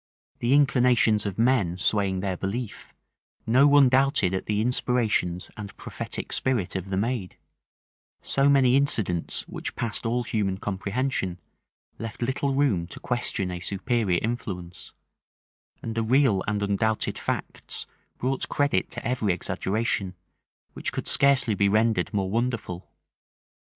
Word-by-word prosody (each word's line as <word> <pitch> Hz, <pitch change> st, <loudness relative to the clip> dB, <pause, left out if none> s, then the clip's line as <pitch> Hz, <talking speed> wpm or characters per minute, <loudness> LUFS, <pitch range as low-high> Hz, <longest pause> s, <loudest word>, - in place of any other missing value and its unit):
The 120 Hz, +3 st, +2 dB
inclinations 125 Hz, -6 st, +3 dB
of 95 Hz, -, -5 dB
men 115 Hz, -7 st, +2 dB
swaying 95 Hz, -1 st, +1 dB
their 95 Hz, -1 st, -2 dB
belief, 100 Hz, +5 st, -5 dB, 0.5 s
no 130 Hz, +5 st, +5 dB
one 145 Hz, -2 st, +6 dB
doubted 130 Hz, -, +2 dB
of 95 Hz, -, -2 dB
the 105 Hz, -1 st, 0 dB
inspirations 110 Hz, -6 st, 0 dB
and 105 Hz, -2 st, -9 dB
prophetic -, -, -5 dB
spirit 120 Hz, -10 st, -1 dB
of 95 Hz, 0 st, -4 dB
the 95 Hz, -, -1 dB
maid: 110 Hz, -2 st, -2 dB, 0.9 s
so 140 Hz, +1 st, +3 dB
many 135 Hz, -3 st, +5 dB
incidents 110 Hz, -, 0 dB
which -, -, -6 dB
passed 115 Hz, -4 st, -2 dB
all 120 Hz, +1 st, 0 dB
human 100 Hz, -5 st, -1 dB
comprehension, 100 Hz, -1 st, -2 dB, 0.6 s
left 115 Hz, +1 st, -5 dB
little 130 Hz, +3 st, 0 dB
room 130 Hz, -12 st, +1 dB
to -, -, -9 dB
question 115 Hz, -6 st, -1 dB
a 90 Hz, -, -5 dB
superior 100 Hz, 0 st, 0 dB
influence: 95 Hz, -7 st, -5 dB, 0.9 s
and 115 Hz, -, -4 dB
the 115 Hz, -, -1 dB
real 115 Hz, -4 st, +3 dB
and 105 Hz, -1 st, -1 dB
undoubted 105 Hz, +2 st, 0 dB
facts -, -, -3 dB, 0.3 s
brought 130 Hz, +1 st, -2 dB
credit 145 Hz, 0 st, +1 dB
to -, -, -4 dB
every 120 Hz, -5 st, 0 dB
exaggeration, 95 Hz, +1 st, -1 dB, 0.6 s
which -, -, -3 dB
could -, -, -5 dB
scarcely 135 Hz, -5 st, +5 dB
be 100 Hz, 0 st, +2 dB
rendered 110 Hz, +2 st, +2 dB
more 95 Hz, -3 st, -1 dB
wonderful. 115 Hz, -6 st, -2 dB
110 Hz, 135 wpm, -26 LUFS, 95-125 Hz, 0.9 s, one